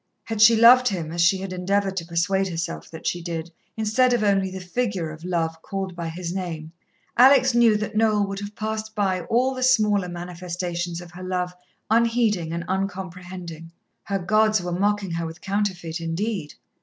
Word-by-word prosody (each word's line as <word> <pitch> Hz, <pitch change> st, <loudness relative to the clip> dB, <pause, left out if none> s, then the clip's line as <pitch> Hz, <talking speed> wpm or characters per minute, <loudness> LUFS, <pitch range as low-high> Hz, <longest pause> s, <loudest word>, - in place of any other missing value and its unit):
Had 225 Hz, -2 st, -3 dB
she 230 Hz, +1 st, +8 dB
loved 245 Hz, +3 st, +7 dB
him 170 Hz, -7 st, -2 dB
as 170 Hz, +1 st, -1 dB
she 175 Hz, +3 st, +4 dB
had 190 Hz, 0 st, -5 dB
endeavoured 195 Hz, +1 st, 0 dB
to 165 Hz, -, -2 dB
persuade 190 Hz, +3 st, +1 dB
herself 170 Hz, -2 st, -4 dB
that 160 Hz, -, -10 dB
she 175 Hz, -, -1 dB
did, 170 Hz, -1 st, -5 dB, 0.3 s
instead 220 Hz, +4 st, +2 dB
of 235 Hz, -3 st, +1 dB
only 195 Hz, -2 st, +2 dB
the 190 Hz, 0 st, -6 dB
figure 185 Hz, -3 st, -2 dB
of 155 Hz, +1 st, -11 dB
Love 165 Hz, -2 st, -2 dB
called 190 Hz, -1 st, -5 dB
by 170 Hz, -1 st, -4 dB
his 170 Hz, +1 st, -5 dB
name, 165 Hz, -4 st, -5 dB, 0.5 s
Alex 260 Hz, 0 st, +6 dB
knew 235 Hz, -3 st, +5 dB
that 215 Hz, +1 st, -4 dB
Noel 215 Hz, -2 st, +3 dB
would 195 Hz, 0 st, -5 dB
have 205 Hz, +1 st, -7 dB
passed 220 Hz, 0 st, -4 dB
by 190 Hz, -3 st, 0 dB
all 255 Hz, +3 st, +2 dB
the 255 Hz, -, -6 dB
smaller 210 Hz, -7 st, +3 dB
manifestations 175 Hz, 0 st, -4 dB
of 175 Hz, -1 st, -12 dB
her 180 Hz, +1 st, -11 dB
love 180 Hz, -1 st, -2 dB, 0.4 s
unheeding 225 Hz, -7 st, +2 dB
and 170 Hz, +1 st, -4 dB
uncomprehending. 180 Hz, -3 st, -5 dB, 0.3 s
Her 200 Hz, -, -1 dB
gods 215 Hz, +3 st, +3 dB
were 175 Hz, 0 st, -4 dB
mocking 200 Hz, +1 st, 0 dB
her 165 Hz, 0 st, -2 dB
with 160 Hz, +1 st, -9 dB
counterfeit 185 Hz, -5 st, -2 dB
indeed. 165 Hz, 0 st, -3 dB
190 Hz, 180 wpm, -24 LUFS, 175-215 Hz, 0.5 s, she